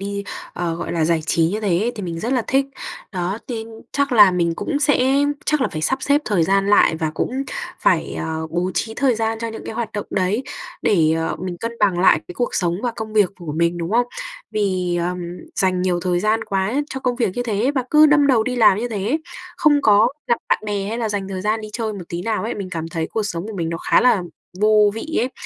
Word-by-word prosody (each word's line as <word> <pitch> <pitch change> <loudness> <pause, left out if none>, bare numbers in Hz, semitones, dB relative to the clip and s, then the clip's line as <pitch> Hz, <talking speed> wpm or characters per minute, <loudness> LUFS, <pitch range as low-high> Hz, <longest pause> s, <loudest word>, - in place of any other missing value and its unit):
đi, 200 0 -4 0.3
ờ, 170 -2 -2
gọi 170 - -4
là, 165 -2 +1
giải 165 -1 +1
trí 165 +1 +2
như 215 +3 -2
thế 205 +4 +1
thì 205 - -6
mình 165 -2 -4
rất 240 +4 -1
là 250 -3 +2
thích. 270 +1 +2 0.5
Đó, 185 +3 -2
nên 225 -2 -4 0.3
chắc 280 -1 0
là 210 -5 +8
mình 170 -2 +1
cũng 290 -3 -2
sẽ 270 -2 +3 0.3
chắc 300 -2 +2
là - - +2
phải 155 0 -4
sắp 265 +6 0
xếp 285 +1 +3
thời 190 -6 +1
gian 195 +1 +2
lại, 165 -5 +5
và 160 -1 -1
cũng 265 +2 -2 0.4
phải, - - +2
ờ, 160 0 -3
bố 175 +3 -1
trí 225 0 -2
thời 265 -3 +2
gian 225 0 -1
cho 230 0 -3
những 220 - -8
cái - - -5
hoạt 235 -2 -3
động 205 - -4
đấy 195 +7 0 0.4
để, 160 -5 +3
ờ, 165 - -2
mình 180 -1 -4
cân 230 0 -4
bằng 190 -4 +3
lại 185 - +5
cái 180 - -8
cuộc 245 - -2
sống 175 -2 0
và 240 -2 -1
công 220 -1 -5
việc 205 -4 +3
của 170 -5 -6
mình, 170 +2 0
đúng 170 +2 -3
không? 240 +1 +3 0.4
Vì, 185 -4 0
ờm, 180 +1 -1 0.4
dành 185 -2 +1
nhiều 180 -2 0
thời 180 -1 +1
gian 220 +2 +1
quá 195 +4 -1 0.2
cho 265 - -4
công 250 -2 -1
việc 235 -6 +1
như 245 - 0
thế 230 +3 0
và 260 - +1
cứ 305 0 +7
đâm 295 -1 +4
đầu 250 -5 +4
đi 250 +1 -2
làm 210 -4 +5
như 245 - -2
thế, 220 +7 -1 0.4
không 290 -2 +3
có 215 +2 +5 0.2
gặp 235 -2 +3
bạn - - +3
bè 200 -1 -2
hay 230 +2 -3
là 225 -2 -1
dành 200 -2 -3
thời 190 -1 -4
gian 215 +1 0
đi 215 - -7
chơi 220 -2 -2
một 190 -4 -7
tí 170 +1 -4
nào 220 0 -1
ấy, 230 - -3
mình 195 -3 -6
cảm 165 -1 -4
thấy 165 -1 -2
cuộc 220 - 0
sống 185 -2 -4
của 215 - -7
mình 165 -2 -2
nó 165 - -2
khá - - +3
là 225 -7 +4 0.4
vô 210 -1 +5
vị 310 +8 -5
ấy. 255 - -1
210 Hz, 250 wpm, -21 LUFS, 180-235 Hz, 0.5 s, là